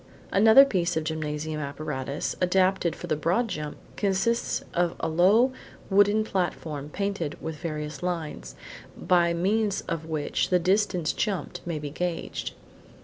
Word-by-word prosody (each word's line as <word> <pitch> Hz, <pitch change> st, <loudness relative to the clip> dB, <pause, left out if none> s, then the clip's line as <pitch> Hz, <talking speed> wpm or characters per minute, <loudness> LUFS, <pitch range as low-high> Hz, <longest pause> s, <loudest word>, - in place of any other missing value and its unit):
Another 220 Hz, +7 st, +8 dB
piece 175 Hz, -9 st, 0 dB
of 160 Hz, -, 0 dB
gymnasium 155 Hz, 0 st, -3 dB
apparatus, 140 Hz, -1 st, -3 dB
adapted 185 Hz, -1 st, +2 dB
for -, -, -7 dB
the 160 Hz, -3 st, 0 dB
broad 175 Hz, +11 st, +1 dB
jump, 150 Hz, -5 st, -5 dB, 0.2 s
consists 200 Hz, +4 st, 0 dB
of 175 Hz, -1 st, +1 dB
a -, -, -1 dB
low 200 Hz, +11 st, +4 dB, 0.4 s
wooden 205 Hz, +2 st, +4 dB
platform 160 Hz, -7 st, -3 dB
painted 195 Hz, -4 st, -3 dB
with 160 Hz, -1 st, -5 dB
various 150 Hz, -2 st, -5 dB
lines, 160 Hz, -, -4 dB, 0.4 s
by 175 Hz, -1 st, +3 dB
means 200 Hz, +3 st, +1 dB
of 165 Hz, -1 st, -4 dB
which 155 Hz, -2 st, -1 dB
the 180 Hz, -, +4 dB
distance 180 Hz, -2 st, +1 dB
jumped 190 Hz, -4 st, -2 dB
may 170 Hz, -2 st, -2 dB
be 145 Hz, -1 st, -5 dB
gauged. 175 Hz, +2 st, -3 dB
175 Hz, 140 wpm, -26 LUFS, 155-195 Hz, 0.4 s, Another